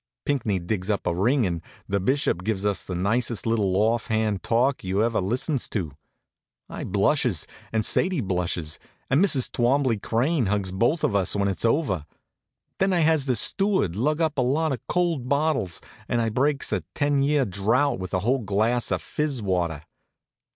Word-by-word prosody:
Pinckney 120 Hz, -9 st, 0 dB
digs 90 Hz, +2 st, -3 dB
up 100 Hz, -2 st, -1 dB
a -, -, +1 dB
ring, 115 Hz, +8 st, +2 dB
and 85 Hz, -3 st, -2 dB, 0.3 s
the 100 Hz, 0 st, 0 dB
bishop 100 Hz, -4 st, 0 dB
gives 105 Hz, -2 st, -2 dB
us 100 Hz, -1 st, 0 dB
the 90 Hz, -, -5 dB
nicest 110 Hz, +5 st, 0 dB
little 105 Hz, -5 st, +1 dB
off 110 Hz, +2 st, +1 dB
hand 110 Hz, -3 st, 0 dB
talk 125 Hz, +4 st, +1 dB
you 95 Hz, +3 st, 0 dB
ever 115 Hz, -2 st, +1 dB
listens 125 Hz, -, -1 dB
to. 90 Hz, -9 st, -3 dB, 0.8 s
I -, -, -6 dB
blushes, 100 Hz, -, +1 dB, 0.3 s
and 110 Hz, -1 st, 0 dB
Sadie 185 Hz, -3 st, +1 dB
blushes, 90 Hz, -6 st, -2 dB, 0.3 s
and 145 Hz, +8 st, +4 dB
Mrs. 140 Hz, -10 st, +2 dB
Twombley 125 Hz, -2 st, +2 dB
Crane 125 Hz, -, +1 dB
hugs 100 Hz, -2 st, 0 dB
both 120 Hz, -, +1 dB
of 100 Hz, -, +1 dB
us 95 Hz, -1 st, +2 dB
when 100 Hz, -1 st, +1 dB
it's 95 Hz, +3 st, -1 dB
over. 110 Hz, -, 0 dB, 0.7 s
Then 190 Hz, 0 st, +2 dB
I 175 Hz, -, +2 dB
has 155 Hz, -3 st, +2 dB
the 130 Hz, -, +2 dB
steward 190 Hz, -, +2 dB
lug 150 Hz, -, 0 dB
up 155 Hz, -3 st, 0 dB
a -, -, +4 dB
lot 145 Hz, +5 st, +1 dB
of 125 Hz, -, -4 dB
cold 170 Hz, -8 st, 0 dB
bottles 140 Hz, -, 0 dB, 0.3 s
and 120 Hz, -, +1 dB
I 115 Hz, -1 st, +1 dB
breaks 140 Hz, +5 st, 0 dB
a -, -, 0 dB
ten 145 Hz, -2 st, +1 dB
year 140 Hz, -1 st, +2 dB
drouth 110 Hz, +7 st, +1 dB
with 95 Hz, -1 st, -6 dB
a 90 Hz, -, 0 dB
whole 125 Hz, +6 st, +1 dB
glass 110 Hz, +3 st, 0 dB
of -, -, -1 dB
fizz 145 Hz, -6 st, -2 dB
water. 85 Hz, -5 st, -1 dB
115 Hz, 180 wpm, -25 LUFS, 95-140 Hz, 0.8 s, and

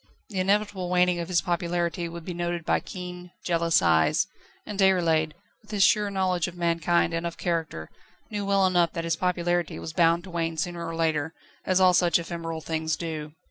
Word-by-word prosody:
The 195 Hz, -3 st, -3 dB
inevitable 195 Hz, -1 st, 0 dB
waning 180 Hz, -1 st, +3 dB
of 170 Hz, -, -3 dB
his 175 Hz, -1 st, +2 dB
popularity 175 Hz, -1 st, -1 dB
would 170 Hz, -1 st, -8 dB
be 180 Hz, -, -4 dB
noted 175 Hz, -1 st, -3 dB
by -, -, +2 dB
keen, 180 Hz, -1 st, -8 dB, 0.2 s
jealous 170 Hz, -1 st, +2 dB
eyes; 80 Hz, -2 st, +3 dB, 0.4 s
and 205 Hz, -1 st, -6 dB
Déroulède, 165 Hz, -5 st, +3 dB, 0.3 s
with 215 Hz, -, -24 dB
his 205 Hz, -2 st, +2 dB
sure 210 Hz, -1 st, +4 dB
knowledge 185 Hz, -3 st, 0 dB
of 175 Hz, 0 st, -9 dB
mankind 170 Hz, 0 st, +1 dB
and 165 Hz, 0 st, -1 dB
of 170 Hz, 0 st, -4 dB
character, 160 Hz, -, -3 dB, 0.4 s
knew 205 Hz, -1 st, -2 dB
well 195 Hz, -1 st, +3 dB
enough 175 Hz, -2 st, +2 dB
that 165 Hz, -, -3 dB
his 165 Hz, -1 st, 0 dB
popularity 175 Hz, -1 st, 0 dB
was 160 Hz, -, -6 dB
bound 170 Hz, 0 st, +3 dB
to 185 Hz, -, -10 dB
wane 165 Hz, -1 st, -2 dB
sooner 175 Hz, +1 st, -3 dB
or 165 Hz, -, -4 dB
later, 160 Hz, -1 st, 0 dB, 0.3 s
as 185 Hz, 0 st, +3 dB
all 185 Hz, -1 st, +6 dB
such 175 Hz, -1 st, +4 dB
ephemeral 165 Hz, -1 st, -5 dB
things 160 Hz, 0 st, -1 dB
do. 155 Hz, -3 st, -5 dB
170 Hz, 190 wpm, -26 LUFS, 165-180 Hz, 0.4 s, all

